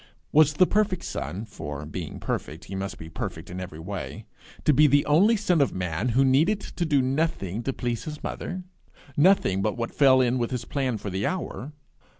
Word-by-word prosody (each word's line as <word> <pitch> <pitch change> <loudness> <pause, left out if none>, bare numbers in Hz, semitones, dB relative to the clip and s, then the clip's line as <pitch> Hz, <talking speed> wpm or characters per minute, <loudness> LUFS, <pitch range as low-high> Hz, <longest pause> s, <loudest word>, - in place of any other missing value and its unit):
Was 150 0 +5
the 185 +5 +5
perfect 200 -2 +1
son, 100 +5 -4
for, 75 -8 -7
being 75 - -6
perfect, 80 +3 -4
he 95 - -9
must 95 0 -4
be 80 - -9
perfect 85 - -6
every 90 -3 -6
way, 85 -5 -6 0.4
to 150 - +5
be 150 +3 +6
the 145 +1 +4
only 190 +10 +5
son 180 -6 +2
of 140 - +1
man 90 +4 -1
who 135 - +5
needed 160 +11 +2
do 150 -6 +2
nothing 130 - -1
to 135 - -1
please 120 -3 -3
his 150 -1 -7
mother 185 0 -4 0.5
nothing 145 - +4
but 105 +4 -1
what 115 -1 -3
fell 135 -2 +6
in 125 0 +2
with 120 - 0
his 125 -3 -3
plan 130 -4 -1
for 100 -1 -6
the 95 +2 -1
hour? 155 -6 -4
130 Hz, 190 wpm, -26 LUFS, 95-155 Hz, 0.5 s, be